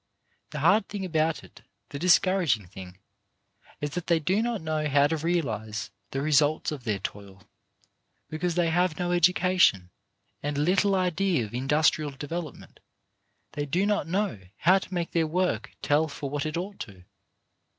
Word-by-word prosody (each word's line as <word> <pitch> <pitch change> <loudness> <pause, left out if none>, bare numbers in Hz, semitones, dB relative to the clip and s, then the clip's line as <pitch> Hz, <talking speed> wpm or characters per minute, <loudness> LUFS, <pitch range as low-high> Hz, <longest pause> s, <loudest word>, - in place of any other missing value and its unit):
The 150 -2 -5
hard 195 +6 +3
thing 200 -2 -4
about 160 -2 0
it, - - -16 0.3
the 140 - -6
discouraging 175 - +3
thing, 90 0 -11 0.8
is 145 0 -2
that 180 +3 -5
they 170 -2 +3
do 185 +7 +1
not 235 -2 -1
know 155 -1 -2
how 140 0 +4
to 155 +3 +1
realize 110 - -2
on - - -46 0.2
the 135 - -3
results 150 +1 +2
of 140 -5 -7
their 105 -3 0
toil; 100 0 -8 0.8
because 165 +2 -2
they 170 -2 +2
have 175 -1 +1
no 175 -1 -1
education 175 - +3 0.5
and 145 0 -3
little 185 +6 +2
idea 180 - +1
of 105 - -12
industrial 150 +4 +2
development, 150 +3 -7 0.7
they 145 0 -4
do 180 +7 +1
not 205 -3 0
know 190 - -1 0.2
how 185 +3 +4
to 190 - -11
make 175 -2 -2
their 165 -2 +1
work 180 +3 -1
tell 150 +2 +2
for 140 -2 -6
what 145 +1 -2
it 155 - -3
ought 195 +3 -5
to. 95 -6 -9
155 Hz, 165 wpm, -27 LUFS, 140-180 Hz, 0.8 s, how